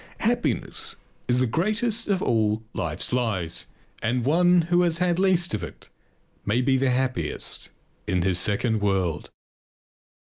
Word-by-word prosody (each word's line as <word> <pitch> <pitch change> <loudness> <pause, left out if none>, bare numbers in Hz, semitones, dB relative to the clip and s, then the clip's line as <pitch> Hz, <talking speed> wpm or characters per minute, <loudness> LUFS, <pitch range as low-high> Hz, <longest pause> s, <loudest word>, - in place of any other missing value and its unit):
Happiness - - 0 0.3
is 125 - +2
the 130 - +2
greatest 215 - 0
of 195 -3 0
all 110 -1 +1
life's 85 +7 -3
lies 105 -9 -1 0.3
and 120 +1 0
one 175 +4 +4
who 175 +2 +2
has 170 -2 +2
had 180 -1 +1
least 185 -5 +2
of 105 - -1
it 85 - -10 0.5
may 105 +4 +1
be 130 +1 +2
the 135 0 +2
happiest 125 - -1 0.4
in 90 0 +1
his 90 -1 +3
second 110 +2 +1
world. 95 -6 -1
125 Hz, 140 wpm, -25 LUFS, -, 0.5 s, one